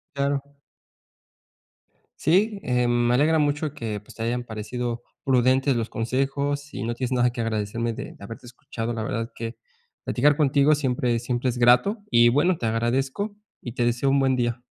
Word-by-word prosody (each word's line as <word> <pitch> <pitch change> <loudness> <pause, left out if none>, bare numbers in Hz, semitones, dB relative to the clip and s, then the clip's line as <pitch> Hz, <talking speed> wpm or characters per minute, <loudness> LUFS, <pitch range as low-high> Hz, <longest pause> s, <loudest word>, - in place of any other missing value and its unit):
Claro. 140 0 0 1.8
Sí, 200 +5 +2
em, 125 -1 +1 0.2
me 120 - +3
alegra 155 +5 +3
mucho 150 0 0
que, 110 -7 -4
pues, 105 - -16
te 115 - -6
hayan 120 +2 -1
parecido 120 +2 -4 0.2
prudentes 130 +1 +3
los 115 -1 -1
consejos 140 +4 -2
y - - -4
no 120 +1 -2
tienes 125 +1 -3
nada 125 -1 +3
que 120 0 -6
agradecerme 115 +1 -2
de - - -7
de - - -13
haberte 115 +4 -9
escuchado. 120 -1 -5
La 115 -1 -3
verdad 115 +2 -3
que 115 0 -6 0.5
platicar 145 +3 +3
contigo 145 0 +4
siempre 125 -4 0
siempre 120 +2 -2
es 125 0 -2
grato. 125 - +4
Y 120 -1 +6
bueno, 155 +8 +2
te 115 - -2
agradezco 130 - -1 0.2
y 120 - -7
te 120 0 -1
deseo 120 +3 +1
un 140 - +3
buen 135 -1 +2
día. 120 0 -1
125 Hz, 175 wpm, -24 LUFS, 115-140 Hz, 1.8 s, Y